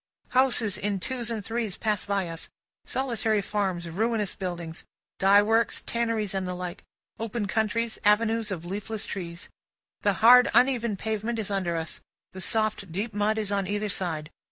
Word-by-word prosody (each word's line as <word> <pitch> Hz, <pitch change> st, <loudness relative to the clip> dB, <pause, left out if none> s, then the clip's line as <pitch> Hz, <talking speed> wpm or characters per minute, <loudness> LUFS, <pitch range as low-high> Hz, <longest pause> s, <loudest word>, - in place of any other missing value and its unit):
Houses 250 Hz, -5 st, +3 dB
in 200 Hz, -1 st, -1 dB
twos 240 Hz, +2 st, -2 dB
and 220 Hz, -3 st, -3 dB
threes 225 Hz, -4 st, -2 dB
pass 215 Hz, -3 st, 0 dB
by 200 Hz, -2 st, 0 dB
us, 165 Hz, -1 st, -7 dB, 0.4 s
solitary 230 Hz, -5 st, 0 dB
farms, 190 Hz, -4 st, -1 dB
ruinous 210 Hz, +4 st, 0 dB
buildings, 175 Hz, -3 st, -5 dB, 0.4 s
dye 200 Hz, +1 st, +6 dB
works, 225 Hz, +1 st, +2 dB
tanneries, 230 Hz, -4 st, -1 dB
and 190 Hz, -1 st, -1 dB
the 180 Hz, -, -3 dB
like, 180 Hz, -1 st, -6 dB, 0.4 s
open 225 Hz, -1 st, -2 dB
country, 220 Hz, +3 st, +1 dB, 0.2 s
avenues 220 Hz, +1 st, +3 dB
of 175 Hz, -4 st, -4 dB
leafless 210 Hz, +4 st, -4 dB
trees. 170 Hz, -2 st, -6 dB, 0.5 s
The 205 Hz, -, +3 dB
hard 245 Hz, +5 st, +7 dB
uneven 235 Hz, -5 st, +3 dB
pavement 220 Hz, +3 st, -2 dB
is 210 Hz, -2 st, -3 dB
under 185 Hz, -4 st, 0 dB
us, 160 Hz, -1 st, -4 dB, 0.3 s
the 185 Hz, -, -7 dB
soft 215 Hz, -3 st, 0 dB
deep 205 Hz, +6 st, -3 dB
mud 210 Hz, +1 st, +1 dB
is 210 Hz, -2 st, -1 dB
on 200 Hz, -2 st, 0 dB
either 205 Hz, +1 st, -1 dB
side. 160 Hz, -5 st, -2 dB
210 Hz, 160 wpm, -27 LUFS, 190-225 Hz, 0.5 s, hard